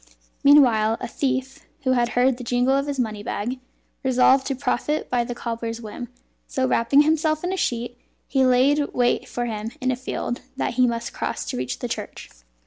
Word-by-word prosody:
Meanwhile 235 Hz, -6 st, +5 dB
a 245 Hz, -, -4 dB
thief 265 Hz, +1 st, -2 dB, 0.2 s
(who 260 Hz, -, +2 dB
had 240 Hz, -2 st, +2 dB
heard 250 Hz, 0 st, +3 dB
the 250 Hz, -, -7 dB
jingle 245 Hz, +2 st, +2 dB
of 275 Hz, +1 st, 0 dB
his 280 Hz, -2 st, -3 dB
money 215 Hz, -4 st, -2 dB
bag) 235 Hz, +4 st, -3 dB, 0.4 s
resolved 260 Hz, +1 st, +4 dB
to 270 Hz, -, -1 dB
profit 285 Hz, +3 st, -1 dB
by 245 Hz, -1 st, +2 dB
the 240 Hz, 0 st, -5 dB
cobbler's 230 Hz, -1 st, -4 dB
whim; 235 Hz, +2 st, -7 dB, 0.4 s
so 260 Hz, -1 st, 0 dB
wrapping 255 Hz, +4 st, +4 dB
himself 310 Hz, 0 st, +1 dB
in 360 Hz, +1 st, -1 dB
a -, -, 0 dB
sheet, 240 Hz, -7 st, -2 dB, 0.3 s
he 270 Hz, -1 st, +2 dB
laid 270 Hz, +3 st, +3 dB
wait 245 Hz, -1 st, +1 dB
for 240 Hz, -, -3 dB
him 220 Hz, -1 st, -4 dB
in 255 Hz, 0 st, 0 dB
a -, -, 0 dB
field 245 Hz, -1 st, -4 dB, 0.2 s
that -, -, -1 dB
he 250 Hz, +1 st, +3 dB
must 235 Hz, -1 st, -3 dB
cross -, -, -3 dB
to -, -, -4 dB
reach 125 Hz, 0 st, -3 dB
the -, -, -4 dB
church. -, -, -6 dB
250 Hz, 195 wpm, -23 LUFS, 235-270 Hz, 0.4 s, Meanwhile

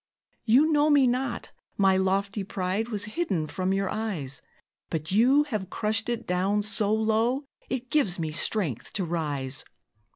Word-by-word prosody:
"You 270 Hz, +8 st, +5 dB
know 295 Hz, 0 st, +4 dB
me 285 Hz, -3 st, +5 dB
not; 250 Hz, 0 st, -1 dB, 0.3 s
my 195 Hz, -1 st, +4 dB
lofty 195 Hz, +2 st, 0 dB
pride 190 Hz, +3 st, -2 dB
Was 205 Hz, -3 st, 0 dB
hidden 215 Hz, -, -1 dB
from 185 Hz, +4 st, -2 dB
your 195 Hz, 0 st, 0 dB
eyes; 170 Hz, -12 st, -3 dB, 0.5 s
But 160 Hz, 0 st, -3 dB
you 255 Hz, +8 st, +5 dB
have 215 Hz, -10 st, -4 dB
crushed 220 Hz, +3 st, -1 dB
it 235 Hz, -1 st, -2 dB
down 195 Hz, +3 st, +1 dB
so 210 Hz, -1 st, 0 dB
low 225 Hz, +5 st, +1 dB, 0.2 s
It 250 Hz, -1 st, -4 dB
gives 215 Hz, -13 st, +2 dB
me 160 Hz, -2 st, -2 dB
strength 160 Hz, -, 0 dB
to 190 Hz, -, -1 dB
rise. 145 Hz, -5 st, -3 dB
205 Hz, 155 wpm, -27 LUFS, 185-235 Hz, 0.5 s, You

